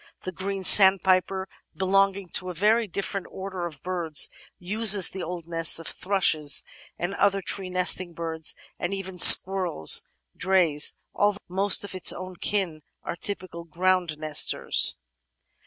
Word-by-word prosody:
The 185 Hz, -, -7 dB
Green 190 Hz, +1 st, -7 dB
Sandpiper, 190 Hz, 0 st, +4 dB, 0.3 s
belonging 195 Hz, 0 st, -1 dB
to 185 Hz, +2 st, -3 dB
a 180 Hz, -, -9 dB
very 215 Hz, +5 st, 0 dB
different 195 Hz, +1 st, -6 dB
order 190 Hz, -2 st, -8 dB
of 150 Hz, -5 st, -16 dB
birds, 175 Hz, -4 st, 0 dB, 0.3 s
uses 200 Hz, 0 st, +3 dB
the 190 Hz, -, -9 dB
old 170 Hz, -1 st, -9 dB
nests 165 Hz, -1 st, 0 dB
of 165 Hz, -, -5 dB
thrushes 160 Hz, -7 st, -1 dB, 0.3 s
and 175 Hz, +3 st, -6 dB
other 200 Hz, 0 st, -1 dB
tree 190 Hz, 0 st, -4 dB
nesting 180 Hz, -1 st, +1 dB
birds 160 Hz, -1 st, -4 dB
— -, -, -31 dB
and 180 Hz, +3 st, -5 dB
even 190 Hz, -2 st, -9 dB
squirrel's 180 Hz, -, +5 dB, 0.3 s
"dreys"! 175 Hz, -6 st, +1 dB
— -, -, -45 dB
^although 205 Hz, 0 st, -1 dB
most 195 Hz, +3 st, 0 dB
of 200 Hz, -, -8 dB
its 185 Hz, -2 st, +2 dB
own 185 Hz, 0 st, -10 dB
kin 180 Hz, -6 st, -4 dB, 0.2 s
are -, -, -7 dB
typical 180 Hz, -2 st, -8 dB
ground 175 Hz, -1 st, -3 dB
nesters. 155 Hz, -1 st, +3 dB
185 Hz, 145 wpm, -23 LUFS, 170-195 Hz, 0.3 s, squirrel's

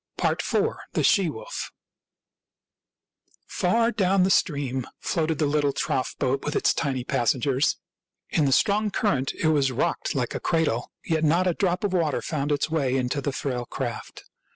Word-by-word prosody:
IV. -, -, +1 dB, 0.6 s
THE -, -, +1 dB
SHE 195 Hz, -5 st, +4 dB
WOLF 110 Hz, -7 st, -6 dB, 1.7 s
Far 230 Hz, +6 st, +1 dB
down 195 Hz, -3 st, +2 dB
the 190 Hz, -, +2 dB
stream 140 Hz, -9 st, 0 dB
floated 160 Hz, -1 st, -1 dB
the 155 Hz, -, +1 dB
little 145 Hz, -1 st, +1 dB
trough 130 Hz, -, -1 dB
boat 135 Hz, +2 st, 0 dB
with 150 Hz, -, -3 dB
its -, -, +3 dB
tiny 135 Hz, -5 st, -1 dB
passengers. 130 Hz, +3 st, +1 dB, 0.5 s
In 155 Hz, -, +2 dB
the 135 Hz, -, +2 dB
strong 210 Hz, +9 st, +3 dB
cur 205 Hz, 0 st, +1 dB
rent 130 Hz, 0 st, -2 dB
it 160 Hz, -, +1 dB
was 140 Hz, -4 st, +2 dB
rocked 125 Hz, -, -1 dB
like -, -, -1 dB
a -, -, -3 dB
cradle, 155 Hz, -8 st, 0 dB
yet 160 Hz, -1 st, 0 dB
not 170 Hz, +4 st, +3 dB
a 180 Hz, -, +2 dB
drop 180 Hz, +3 st, 0 dB
of 200 Hz, -2 st, 0 dB
water 165 Hz, -5 st, +1 dB
found 150 Hz, -2 st, -2 dB
its 145 Hz, 0 st, +1 dB
way 145 Hz, -5 st, 0 dB
into 130 Hz, +2 st, -1 dB
the 140 Hz, -, -1 dB
frail 125 Hz, -2 st, -3 dB
craft. -, -, -5 dB
150 Hz, 170 wpm, -25 LUFS, 135-180 Hz, 1.7 s, SHE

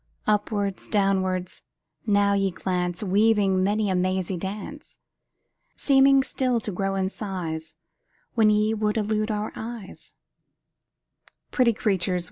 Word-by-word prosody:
Upwards, 205 Hz, -2 st, -1 dB
downwards, 190 Hz, -3 st, 0 dB, 0.5 s
now 200 Hz, -1 st, +3 dB
ye 195 Hz, -1 st, +1 dB
glance, 180 Hz, 0 st, -2 dB
Weaving 200 Hz, -1 st, +3 dB
many 210 Hz, +2 st, +1 dB
a 190 Hz, -, 0 dB
mazy 185 Hz, 0 st, 0 dB
dance; 205 Hz, -, -7 dB, 0.8 s
Seeming 275 Hz, -1 st, +4 dB
still 255 Hz, -3 st, 0 dB
to 210 Hz, -, -4 dB
grow 195 Hz, +1 st, -2 dB
in 190 Hz, -1 st, 0 dB
size 165 Hz, -7 st, -5 dB, 0.6 s
When 220 Hz, -2 st, +4 dB
ye 210 Hz, +1 st, +2 dB
would 215 Hz, 0 st, -1 dB
elude 215 Hz, 0 st, 0 dB
our 210 Hz, 0 st, -2 dB
eyes 225 Hz, -3 st, -9 dB, 1.4 s
Pretty 245 Hz, -3 st, +3 dB
creatures! 190 Hz, -4 st, 0 dB
205 Hz, 115 wpm, -25 LUFS, 185-215 Hz, 1.4 s, Seeming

